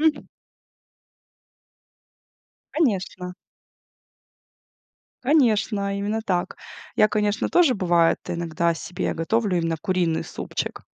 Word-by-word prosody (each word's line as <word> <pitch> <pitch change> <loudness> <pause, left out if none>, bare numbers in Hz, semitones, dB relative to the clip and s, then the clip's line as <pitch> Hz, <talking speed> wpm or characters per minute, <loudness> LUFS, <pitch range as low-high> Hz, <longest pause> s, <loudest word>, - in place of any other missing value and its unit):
М. 310 -2 +1 2.5
Конечно. 190 - -1 1.9
Конечно, 215 -7 +2
именно 210 +2 -1
так. 180 -5 -1 0.4
Я, 215 - +6
конечно, 210 0 0
тоже 330 -8 +4
бывает 175 -3 +3
иногда 170 0 0
себе 180 +3 -3
готовлю 200 +3 0
именно 165 -1 0
куриный 175 -4 0
супчик. - - -5
200 Hz, 80 wpm, -24 LUFS, 175-225 Hz, 2.5 s, Я